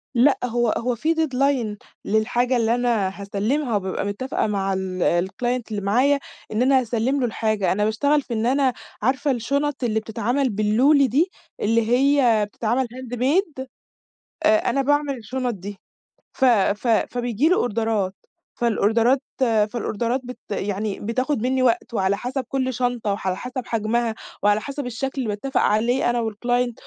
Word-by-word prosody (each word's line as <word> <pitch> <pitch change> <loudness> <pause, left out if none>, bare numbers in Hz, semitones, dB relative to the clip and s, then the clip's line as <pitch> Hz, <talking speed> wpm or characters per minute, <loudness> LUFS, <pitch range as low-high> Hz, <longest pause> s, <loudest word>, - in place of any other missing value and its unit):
لأ، 260 +4 +5
هو 240 -1 +1
هو 245 +1 -1
في 315 +8 0
deadline 270 -7 0 0.3
للحاجة 245 +4 +1
اللي 230 0 +2
أنا 220 -6 0
هاسلّمها 220 +6 -1
وبابقى 190 0 -2
متفقة 215 +7 -2
مع 195 -2 -1
ال 185 -1 0
الclient 245 +4 -2
اللي 205 -1 -2
معايا، 255 +8 +3 0.3
إن 215 +3 0
أنا 265 +1 +5
هاسلّم 245 +3 0
له 255 - +1
الحاجة، 215 -3 0
أنا 210 +2 +1
باشتغل 285 +8 +2
في 255 - -7
إن 225 0 -1
أنا 260 0 +2 0.3
عارفة 270 +5 +1
الشُنَط 280 +3 -1
اللي 220 -2 +1
بتتعمل 245 +5 -1
باللولي 240 +8 +3
دي، 310 - +1 0.3
اللي 230 +2 +3
هي 250 -4 +4
بتتعمل 235 +5 -1
handmade؟ 260 - -1 0.8
آآ، 325 +4 +3
أنا 275 - +1
باعمل 290 -1 +1
الشُنَط 245 +2 -3
دي. 200 0 -8 0.6
ف 265 - -1
ف 215 -2 +3
فبييجي 245 +4 +1
لي 365 - +4
أوردرات، 220 - 0 0.4
فالأوردرات 235 +3 +2 0.2
فالأوردرات 230 +1 0
بت 250 +1 -8
يعني 205 0 -2
بتاخد 255 +3 -1
منّي 260 +1 +1
وقت 235 -1 +1
وعلى 195 -1 +1
حسب 255 +4 -3
كُلّ 260 -1 -1
شنطة 245 -3 -1
وعلى 190 -2 -2
حسب 250 +3 -6
حجمها 230 +1 0 0.3
وعلى 205 +1 +3
حسب 280 +1 -5
الشكل 250 +3 -3
اللي 235 - -3
باتّفق 210 +6 -1
عليه 240 +4 +2
أنا 240 0 0
والclient 245 +3 0
240 Hz, 150 wpm, -23 LUFS, 215-265 Hz, 0.8 s, لأ